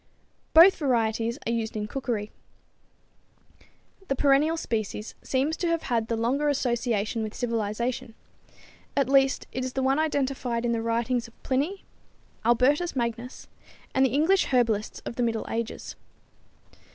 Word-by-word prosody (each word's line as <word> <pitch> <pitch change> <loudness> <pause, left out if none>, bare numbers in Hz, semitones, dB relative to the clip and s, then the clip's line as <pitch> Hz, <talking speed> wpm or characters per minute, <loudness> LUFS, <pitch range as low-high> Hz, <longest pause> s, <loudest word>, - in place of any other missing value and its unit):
Both 345 +4 +9
varieties 235 -4 0
are 230 - 0
used 225 -1 -2
in 210 - -2
cookery. 225 -4 -3 1.8
The 275 - 0
perennial 290 +4 +3
species 215 -5 -3
seems 275 +4 0
to 350 - -1
have 335 -1 0
had 225 -1 +1
the 230 - -1
longer 270 +6 +1
association 235 -5 0
with 215 0 -4
civilization; 230 0 -2 0.8
at 275 -3 +3
least 270 0 +3
it 255 - -3
is 255 0 -4
the 265 - -1
one 270 +3 +2
identified 265 -6 -1
in 235 - +1
the 230 -1 0
writings 235 +1 0
of 230 - -22
Pliny, 295 +10 -1 0.6
Albertus 260 +9 +3
Magnus 235 0 -3 0.5
and 265 - +3
the 265 - +4
English 320 +9 +3
herbalists 230 -5 0
of 235 - -6
the - - 0
middle 230 -2 0
ages. 230 0 -4
245 Hz, 140 wpm, -26 LUFS, 230-275 Hz, 1.8 s, Both